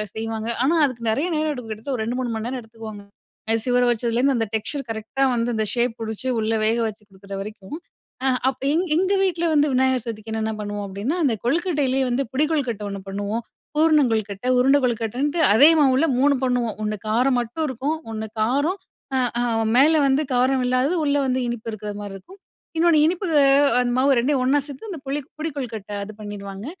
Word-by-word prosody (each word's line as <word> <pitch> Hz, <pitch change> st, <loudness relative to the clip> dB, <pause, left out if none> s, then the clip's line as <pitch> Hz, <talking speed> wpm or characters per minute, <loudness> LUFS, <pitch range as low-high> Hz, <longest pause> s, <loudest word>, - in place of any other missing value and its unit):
செய்வாங்க, 225 Hz, 0 st, -3 dB, 0.2 s
ஆனா 320 Hz, +5 st, +3 dB
அதுக்கு 235 Hz, -4 st, -3 dB
நிறைய 285 Hz, +10 st, 0 dB
நேரம் 310 Hz, 0 st, 0 dB
எடுக்கும் 235 Hz, -4 st, -7 dB
கிட்டத்தட்ட 240 Hz, +5 st, -4 dB
ஒரு 220 Hz, -, -2 dB
2, 245 Hz, +2 st, -2 dB
3 240 Hz, -2 st, -2 dB
மணி 220 Hz, +1 st, -4 dB
நேரம் 255 Hz, 0 st, -4 dB
எடுத்துக்குவாங்க. 220 Hz, -2 st, -10 dB, 0.5 s
அரிசி 225 Hz, +2 st, 0 dB
ஊர 245 Hz, -, +4 dB
வச்சதுலேருந்து 240 Hz, +3 st, +1 dB
அந்த 225 Hz, -, +1 dB
டெக்ஸ்சர் 275 Hz, +6 st, -3 dB
கரெக்ட்டா 220 Hz, +5 st, -2 dB
வந்து 235 Hz, +1 st, 0 dB
அந்த 220 Hz, -, 0 dB
ஷேப் 240 Hz, -1 st, +1 dB
புடுச்சு 220 Hz, +3 st, -4 dB
உள்ள 220 Hz, 0 st, -1 dB
வேகச்சு 220 Hz, -1 st, 0 dB
கொடுக்குற 195 Hz, +1 st, -12 dB
வரைக்கும். 210 Hz, +6 st, -8 dB, 0.5 s
அ -, -, +4 dB, 0.2 s
அப்ப 265 Hz, -, -6 dB
எங் 340 Hz, -, +2 dB
எங்க 380 Hz, +3 st, +2 dB
வீட்ல 345 Hz, -3 st, 0 dB
வந்து 295 Hz, +1 st, +4 dB
விநாயகர் 260 Hz, -2 st, +2 dB
சதுர்திக்கு 220 Hz, -1 st, -6 dB
என்னென்ன 220 Hz, 0 st, -1 dB
பண்ணுவோம் 205 Hz, -1 st, -4 dB
அப்படின்னா 200 Hz, -, -3 dB
அந்த 265 Hz, -, +3 dB
கொழுக்கட்டையிலேயே 285 Hz, -3 st, +1 dB
வந்து 255 Hz, +3 st, 0 dB
புடி 290 Hz, +4 st, +2 dB
கொழுக்கட்ட 250 Hz, -9 st, -1 dB
ஒண்ணு 200 Hz, 0 st, -5 dB
பண்ணுவோம், 205 Hz, +4 st, -3 dB, 0.3 s
பூரண 310 Hz, 0 st, +5 dB
கொழுக்கட்ட, 215 Hz, 0 st, -2 dB
உருண்ட 270 Hz, +3 st, +5 dB
கொழுக்கட்டன்ட்டு 245 Hz, +7 st, -1 dB
அதே 280 Hz, +8 st, +8 dB
மாவுல 275 Hz, +2 st, +4 dB
3 280 Hz, +1 st, +4 dB
பண்ணுவோம். 245 Hz, -4 st, 0 dB
ஒண்ணு 215 Hz, 0 st, -1 dB
காரம் 250 Hz, +4 st, +2 dB
மட்டும் 240 Hz, +7 st, -3 dB
இருக்கும். 275 Hz, +4 st, -2 dB
ஒண்ணு 220 Hz, 0 st, -4 dB
காரம், 285 Hz, -, +1 dB, 0.4 s
அ -, -, +2 dB, 0.2 s
அ -, -, +1 dB, 0.3 s
மேல 295 Hz, +4 st, +6 dB
வந்து 275 Hz, +3 st, +2 dB
காரம் 255 Hz, +1 st, +2 dB
இல்லாதது 255 Hz, +7 st, +1 dB
உள்ள 285 Hz, -, +2 dB
வந்து 255 Hz, 0 st, 0 dB
இனிப்பு 235 Hz, -1 st, -4 dB
இருக்கிற 210 Hz, 0 st, -5 dB
மாதிரி 200 Hz, -1 st, -7 dB
இருக்கும். 380 Hz, -, -16 dB, 0.4 s
இன்னொன்னு 330 Hz, -2 st, +4 dB
இனிப்பு 360 Hz, +3 st, -1 dB, 0.5 s
அந்த 245 Hz, -1 st, 0 dB
மாவு 270 Hz, 0 st, +4 dB
ரெண்டையும் 265 Hz, +1 st, +1 dB
ஒண்ணா 285 Hz, +2 st, +3 dB
சேர்த்து 285 Hz, +10 st, -9 dB
அந்த 320 Hz, -, -7 dB
புளி 285 Hz, +2 st, -1 dB, 0.2 s
புடி 320 Hz, +1 st, -2 dB
கொழுக்கட்டை 220 Hz, -6 st, -5 dB
அது 215 Hz, +2 st, -8 dB
பண்ணிருவாங்க, 200 Hz, -1 st, -7 dB
245 Hz, 190 wpm, -22 LUFS, 220-280 Hz, 0.5 s, அதே